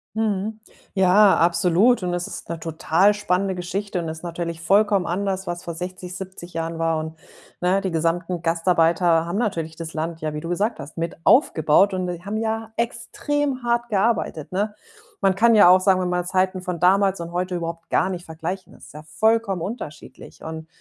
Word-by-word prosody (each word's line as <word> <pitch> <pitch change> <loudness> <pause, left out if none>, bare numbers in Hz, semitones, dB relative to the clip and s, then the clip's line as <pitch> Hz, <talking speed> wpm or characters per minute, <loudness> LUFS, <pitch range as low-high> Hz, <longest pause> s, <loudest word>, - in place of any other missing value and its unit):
Mhm. 215 0 -1 0.3
Ja, 195 +1 +5
absolut 180 +7 +3
und 180 -1 -1
es 175 0 -2
ist - - -9
'ne 170 - -4
total 165 +5 +2
spannende 195 -2 -1
Geschichte 190 +3 -4
und 165 - -4
ist 160 +1 -7
natürlich 170 -1 -4
vollkommen 200 +2 +3
anders, 190 +1 -2
was 175 0 -4
vor 170 - -5
60, 180 +1 -6
70 185 -2 -9
Jahren 165 0 -3
war 165 -1 +1
und, 160 0 -6 0.5
ne, 180 +2 +2
die 195 -2 -3
gesamten 165 +2 -1
Gastarbeiter 165 0 +2
haben 175 +4 -3
natürlich 165 -8 -2
das 165 -1 -6
Land, 165 +1 -3
ja, 155 -1 -3
wie 150 - -4
du 165 - -6
gesagt 210 +6 -1
hast, 140 +4 -11
mit 165 0 -3
aufgebaut 190 - +4
und 185 -1 -2
die 175 -1 -5
haben 205 +2 -3
ja 225 0 -2
extrem 255 +4 -2
hart 240 0 0
gearbeitet, 200 -7 0
ne? 205 +3 -1 0.5
Man 195 -2 +3
kann 230 +3 +5
ja 205 -4 +8
auch 185 +1 +7
sagen, 185 0 +3
man 180 -1 -1
will 180 0 -1
Zeiten 185 0 0
von 180 -2 -4
damals 195 0 +3
und 170 0 -6
heute 180 +1 -2
überhaupt 165 -1 -5
garnicht 185 -1 0
vergleichen. 170 +4 -6
Das - - -15
ist - - -15
ja 150 +1 -10
vollkommen 210 +3 +1
unterschiedlich. 165 -6 -8
Und, 160 0 -7
180 Hz, 190 wpm, -23 LUFS, 165-200 Hz, 0.5 s, ja